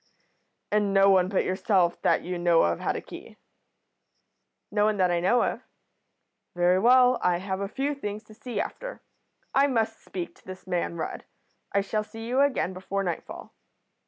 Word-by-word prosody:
"'And 205 -1 +1
no 195 0 +6
one 185 -1 +4
but 195 - +1
yourself, 185 -2 +1
that - - +2
you 180 0 -4
know 175 -1 +4
of, 85 0 0
had - - -1
a - - -3
key?' - - -12 1.3
"'No 205 0 +2
one 215 -1 +1
that 185 -2 +3
I 175 - +1
know 235 +8 +3
of.' - - -2 0.9
"'Very 175 +1 +3
well. 250 +3 +5
I 180 -1 +2
have 190 +1 -4
a 200 - -1
few 275 +7 -2
things 210 -6 -6
to 215 - -16
see 235 +2 -5
after. - - -5 0.5
I 275 +1 +4
must 225 -4 -1
speak 180 -2 -6
to - - -24
this 185 0 -9
man 175 -2 -2
Rudd. 160 - -5 0.5
I 200 - +2
shall 215 +2 -2
see 225 +1 -9
you 255 +3 +2
again 275 -9 +1
before 195 +2 -3
nightfall.' 175 -3 -6
200 Hz, 180 wpm, -26 LUFS, 180-225 Hz, 1.3 s, no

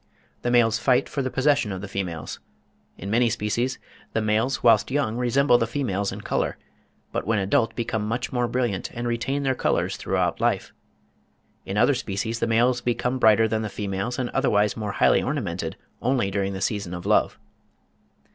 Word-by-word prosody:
The 120 - -1
males 115 -2 +3
fight 125 0 +2
for 140 - -3
the 130 - -1
possession 135 -5 +2
of 95 - -4
the 105 - -6
females. 90 -6 -4 0.6
In 100 +3 -6
many 120 +1 +3
species, 120 +3 -1 0.4
the - - +1
males 110 +5 0
whilst 115 -4 +5
young 130 -5 0
resemble 125 +1 +3
the 115 - 0
females 105 -6 -1
in - - -7
colour; - - -1 0.5
but - - -3
when 110 -1 +2
adult 105 +3 +1
become 110 -3 -2
much 120 +4 -3
more 125 -1 +1
brilliant, 120 -5 -1
and 120 +1 -3
retain 135 +4 -1
their 135 -1 +2
colours - - 0
throughout - - -1
life. - - 0 0.9
In 95 - -3
other 120 +6 +4
species 115 -2 -3
the - - 0
males 120 +3 +2
become 125 +1 -1
brighter 110 -1 +5
than 110 0 -1
the 110 - -3
females 100 +4 -3
and 125 -2 -2
otherwise 105 -6 +2
more 105 -3 -4
highly - - +4
ornamented, - - -3 0.3
only 120 -6 +1
during 100 0 -1
the 95 - -5
season 100 -3 -2
of 85 +1 -8
love. 105 +1 +2
115 Hz, 180 wpm, -24 LUFS, 105-125 Hz, 0.9 s, whilst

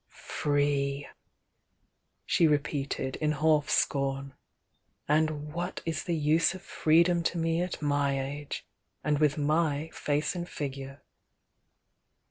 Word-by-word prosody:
"Free!" 145 -1 0 1.2
she 165 - +4
repeated, 140 -2 -1
in 150 -1 +1
sclf 150 0 +3
scom. 135 -2 0 0.7
"And 150 0 +1
what 175 +1 -4
is 165 -2 -2
the 175 - 0
use 160 +4 +3
of 190 - -10
freedom 170 0 +3
to 170 +1 -1
me 165 0 +1
at 180 -3 -4
my 145 -1 +1
age! 140 +2 -5 0.2
— - - -48
and 150 -1 +1
with 150 -1 +3
my 155 +1 +1
face 150 +1 0
and 175 -1 -5
figure!" 135 -1 -6
150 Hz, 120 wpm, -29 LUFS, 140-160 Hz, 1.2 s, she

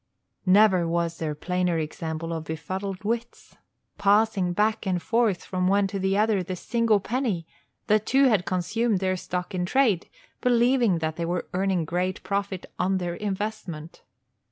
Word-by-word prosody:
Never 185 -3 +5
was 170 0 -1
there 155 -2 -2
plainer 180 +2 0
example 160 +1 -4
of 160 -1 -4
befuddled 185 +5 -5
wits! 235 +2 -4 0.4
Passing 205 -2 +3
back 215 +3 0
and 180 -2 +1
forth, 225 -2 +1
from 185 -1 -1
one 200 +1 +3
to 195 0 -3
the 190 +1 +1
other, 210 -2 +2
the 185 +1 -4
single 230 +2 +1
penny, 215 -5 -2 0.4
the 215 0 +4
two 265 +6 +2
had 215 -8 +3
consumed 215 +5 0
their 185 0 0
stock 180 0 -4
in 180 -1 -1
trade, 215 -2 +2 0.3
believing 240 -5 +3
that 160 -1 -3
they 170 - -1
were 175 +1 -2
earning 185 -2 +1
great 180 +3 -2
profit 195 -1 -2
on 190 +1 +1
their 175 -2 -2
investment. 195 -5 -5
190 Hz, 155 wpm, -26 LUFS, 175-215 Hz, 0.4 s, Never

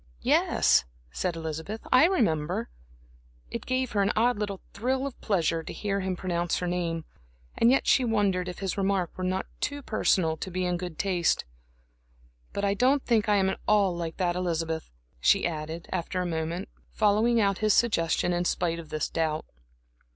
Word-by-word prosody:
"Yes," - - +4 0.3
said 170 - -2
Elizabeth, 160 +6 -5
"I 255 +5 +7
remember." 160 - 0 0.8
It - - -5
gave 255 0 0
her 205 - +1
an 200 +1 +2
odd 235 0 +2
little 200 -2 -3
thrill 260 +6 -1
of 275 - -7
pleasure 170 -5 +1
to - - -8
hear 200 -1 -2
him 190 -1 -2
pronounce 175 -1 -1
her 180 - -2
name, 170 -2 -2 0.5
and 230 - +4
yet 270 - +3
she 260 - +4
wondered 200 -6 +1
if 180 - -7
his 195 0 -3
remark 190 -3 0
were 185 - -5
not 185 +1 -1
too 285 0 -3
personal 170 -8 +1
to 190 - -5
be 185 0 -2
in 180 0 0
good 175 -3 -6
taste. 180 -4 +1 1.1
"But 200 - -2
I 200 - +2
don't 260 +6 +2
think 225 -3 +2
I 210 - +5
am 190 -1 +3
at - - -5
all 200 -4 +3
like 165 -1 -4
that 175 -2 0
Elizabeth," 165 -3 -2 0.3
she - - +4
added, 160 0 -4
after 185 0 -2
a 180 - -1
moment, 165 +2 -3 0.2
following 220 +3 +3
out 200 -3 +2
his 215 -1 +3
suggestion 175 -5 +2
in 175 0 0
spite 170 -1 0
of 160 -2 -10
this 155 - -1
doubt. 160 -1 -1
185 Hz, 180 wpm, -27 LUFS, 170-210 Hz, 1.1 s, I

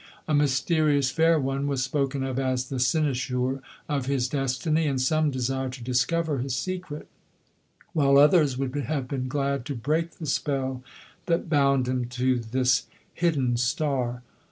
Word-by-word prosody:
A 155 - 0
mysterious 145 -1 +2
fair 165 +1 +3
one 135 +1 -1
was 135 -2 0
spoken 135 0 -1
of 135 -1 -2
as 130 -1 -1
the 135 - -3
cynosure 130 -2 0 0.3
of 140 -3 -2
his 135 -3 +1
destiny, 140 +4 0
and 135 -2 0
some 155 +4 +2
desired 130 0 -2
to 130 -2 -8
discover 145 +5 0
his 130 0 -2
secret, 180 -4 -5 0.9
while 140 -3 +4
others 145 -2 +5
would 135 -1 -2
have 145 -2 -2
been 130 -1 -3
glad 140 -1 -1
to 140 -1 -4
break 155 +7 -1
the 160 - -8
spell 135 -3 -1 0.5
that 165 -1 0
bound 140 -3 +3
him 125 -1 -1
to 125 +1 0
this 125 +3 +1 0.3
hidden 140 -8 +1
star. 125 -1 -1
135 Hz, 155 wpm, -26 LUFS, 130-150 Hz, 0.9 s, others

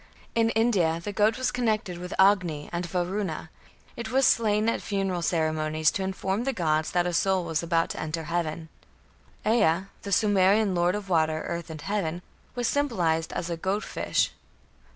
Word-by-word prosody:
In 225 -1 +3
India, 190 -8 +2
the 205 +4 -5
goat 215 +4 +2
was 255 - 0
connected 215 -7 -1
with 180 0 -6
Agni 180 -7 +3
and 170 0 -2
Varuna; 180 -2 -3 0.4
it 230 -2 -6
was 265 +1 +3
slain 215 -2 +3
at 230 - 0
funeral 195 -4 -1
ceremonies 155 -2 +1
to 195 - -3
inform 190 +3 -2
the 270 +1 -1
gods 155 -6 0
that 175 -1 +1
a 180 - -1
soul 190 0 +1
was 165 -2 -1
about 165 -1 +1
to - - -6
enter 160 +1 -3
heaven. 165 -1 -3 0.8
Ea, 205 -6 +3 0.2
the 200 - -6
Sumerian 200 0 +3
lord 175 +2 +2
of 210 -1 -5
water, 160 -3 +1
earth, 170 0 -4
and 155 -2 -8
heaven, 180 -4 -2 0.3
was 245 -1 0
symbolized 175 - 0
as 170 - -3
a 170 - -2
"goat 195 +5 -1
fish". - - 0
180 Hz, 175 wpm, -27 LUFS, 165-210 Hz, 0.8 s, In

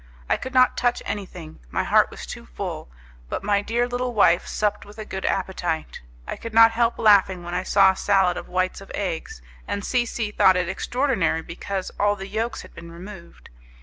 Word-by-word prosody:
I - - +2
could 260 +1 -7
not 255 0 +5
touch 245 0 0
anything, 180 -6 -6
my - - -1
heart - - +4
was - - -9
too - - -9
full, - - -6 0.4
but - - -4
my 200 0 +2
dear 235 +3 0
little 245 0 -3
wife 175 -4 +4
supped 210 -1 -1
with 205 +1 -14
a 215 - -6
good 190 -2 -5
appetite. 180 -4 -2 0.2
I - - -5
could 230 -1 -8
not 225 0 +8
help 230 +1 +1
laughing 195 -4 +4
when 175 0 -6
I 180 - 0
saw 195 0 +5
a - - -7
salad 190 -3 +2
of - - -7
whites 185 +1 -1
of 195 - -12
eggs, 165 - -4 0.2
and 200 - -3
C 245 -2 +1
C 225 -2 -3
thought 190 -3 +5
it 180 -1 0
extraordinary 190 - 0
because 190 +3 -5
all 205 0 +3
the 195 -1 -7
yolks 220 +3 -3
had - - -15
been 170 0 -11
removed. 170 - -12
195 Hz, 205 wpm, -23 LUFS, 180-225 Hz, 0.4 s, not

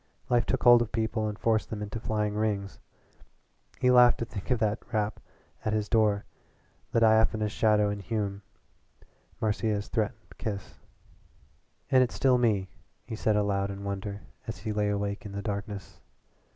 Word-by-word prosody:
Life 120 -1 +2
took - - 0
hold 120 -1 +8
of 120 - -2
people 110 0 -1
and 105 -1 -4
forced 110 -1 +1
them 105 -1 -4
into 105 +2 -5
flying 105 -2 -1
rings. 105 -2 -2 1.0
He 125 - +4
laughed 125 -1 +7
to 115 - -3
think 100 -6 -8
of 125 - +3
that 110 -1 0
rap 110 -1 -1 0.4
at 110 - -1
his 105 -1 0
door, 105 -3 +2 0.7
the - - +3
diaphanous 110 -1 +3
shadow 105 -1 +3
in 105 - -4
Hume, 100 -1 -3 1.0
Marcia's 105 -1 -1
threatened 110 -1 -3
kiss. 100 -4 -5 1.1
"And 130 - +6
it's 125 - +1
still 130 -2 +3
me," 105 -6 +2 0.4
he 110 - -5
said 110 -1 +1
aloud 100 -1 +1
in 100 0 -6
wonder 100 0 -4 0.3
as 115 - -4
he 110 - -4
lay 105 0 +1
awake 100 0 -2
in 105 -2 -8
the 100 0 -4
darkness. 100 -1 -5
105 Hz, 165 wpm, -28 LUFS, 100-110 Hz, 1.1 s, hold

